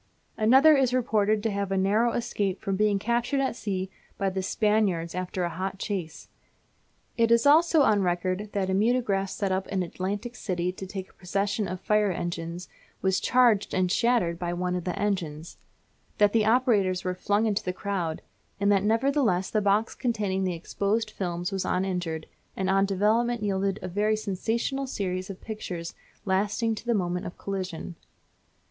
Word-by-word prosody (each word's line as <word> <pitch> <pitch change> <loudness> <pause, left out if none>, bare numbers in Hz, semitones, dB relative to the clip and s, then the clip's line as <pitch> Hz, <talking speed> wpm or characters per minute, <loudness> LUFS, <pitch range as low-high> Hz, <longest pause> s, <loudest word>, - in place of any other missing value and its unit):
Another 265 +8 +6
is 260 -2 +2
reported 215 -3 +1
to 225 - 0
have 200 -1 -2
had 195 - 0
a - - +3
narrow 220 +5 +2
escape 200 -5 -1
from 195 - -2
being 210 0 +2
captured 235 +6 0
at 265 -3 0
sea 190 -4 -3 0.3
by 195 -1 0
the 190 0 -2
Spaniards 200 -4 +1
after 180 0 -3
a 175 - 0
hot 190 +3 -4
chase. 185 -6 -4 0.9
It 230 -1 +3
is 235 +1 +4
also 315 +1 +6
on 210 -5 +3
record 185 +3 -1
that 190 -2 0
a - - +1
mutograph 205 -2 +1
set 195 -1 -2
up 190 0 -1
in 190 -2 -1
Atlantic 200 +7 -4
City 180 -5 -2
to 190 +1 -8
take 190 -1 -7
a - - -32
procession 200 +2 -1
of 180 +1 -5
fire 210 -2 +2
engines 170 0 -4 0.4
was 190 0 +2
charged 240 -5 +3
and 185 -1 +1
shattered 215 -8 +2
by 175 -1 -2
one 180 +1 -1
of 180 - -4
the 180 - -2
engines; 170 -6 -3 0.6
that 205 -1 +4
the 220 -2 +3
operators 215 -7 +2
were 185 - -1
flung 205 +4 +1
into 210 -2 0
the 180 - -1
crowd: 180 -4 -3 0.4
and 200 0 +3
that 200 -1 +4
nevertheless 225 -4 +1
the 215 - +1
box 205 +2 +2
containing 205 -6 -1
the 180 -2 -1
exposed 210 +6 -1
films 175 -1 -3
was 195 -1 -1
uninjured, 180 -4 -2 0.3
and 190 0 0
on 195 0 +3
development 215 +4 +1
yielded 195 -1 0
a - - -3
very 210 +4 +1
sensational 225 +6 -2
series 185 -5 -3
of 195 - -7
pictures 180 -6 -6 0.3
lasting 205 +4 +1
to 220 +2 -8
the 235 - +2
moment 180 -2 -1
of 175 - -9
collision. 185 -3 -5
195 Hz, 180 wpm, -27 LUFS, 185-220 Hz, 0.9 s, Another